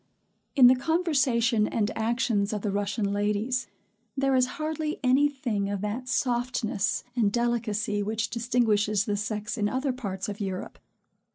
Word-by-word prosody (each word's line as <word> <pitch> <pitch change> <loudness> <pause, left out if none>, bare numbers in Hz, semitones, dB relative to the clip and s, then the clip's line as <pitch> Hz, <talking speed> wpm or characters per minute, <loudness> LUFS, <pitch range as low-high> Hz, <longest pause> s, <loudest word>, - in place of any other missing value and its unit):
In 260 - +7
the 250 +1 +8
conversation 265 -8 +2
and 220 -1 -1
actions 225 -2 0
of 210 - -3
the 205 - 0
Russian 200 0 -1
ladies, 210 +5 0 0.5
there 270 0 +2
is 255 -1 +4
hardly 310 -1 -3
any 265 +3 +4
thing 225 -8 -2
of 200 -1 -3
that 220 +5 -3
softness 245 -4 0
and 220 -5 +2
delicacy 225 -3 0
which 220 +2 -2
distinguishes 215 -3 +1
the 205 - -1
sex 215 +3 -3
in 205 0 +1
other 260 +2 -1
parts 195 -7 -4
of 205 -1 -5
Europe. 190 -2 -5
230 Hz, 150 wpm, -27 LUFS, 205-255 Hz, 0.5 s, the